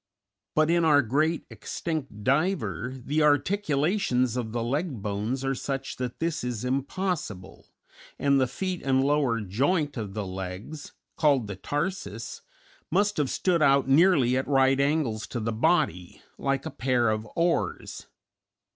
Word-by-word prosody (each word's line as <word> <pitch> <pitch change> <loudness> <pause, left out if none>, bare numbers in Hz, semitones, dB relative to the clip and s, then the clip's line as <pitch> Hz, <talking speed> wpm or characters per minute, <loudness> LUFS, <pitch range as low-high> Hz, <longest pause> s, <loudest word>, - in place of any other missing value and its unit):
But 155 +1 +3
in 170 0 +3
our 145 -3 +5
great 155 +8 0
extinct 145 -10 -5
diver 130 - 0
the 150 +2 +1
articulations 150 - +2
of 120 -3 -3
the 115 0 -2
leg 140 - -2
bones 110 +6 -2
are 135 - +1
such 135 +1 -4
that 125 -1 -4
this 165 -3 -1
is 125 -1 -3
impossible, 140 - -3 0.5
and 140 -1 +3
the 130 - +2
feet 185 +7 -3
and 130 -1 +2
lower 140 -5 +1
joint 145 - 0
of 105 -3 -5
the 105 -2 -2
legs 95 +10 -7 0.2
(called 140 -6 +3
the 100 -1 -6
tarsus) 130 - -4 0.5
must 205 +4 +1
have 145 -4 +1
stood 175 -3 +1
out 140 -2 +4
nearly 140 -4 +4
at 130 - -1
right 135 -1 +3
angles 140 -7 0
to 120 - -4
the 115 0 -2
body, 110 - 0 0.2
like 135 -1 -1
a - - -4
pair 120 -2 +1
of 110 0 -3
oars. 170 0 -1
135 Hz, 145 wpm, -27 LUFS, 115-155 Hz, 0.5 s, our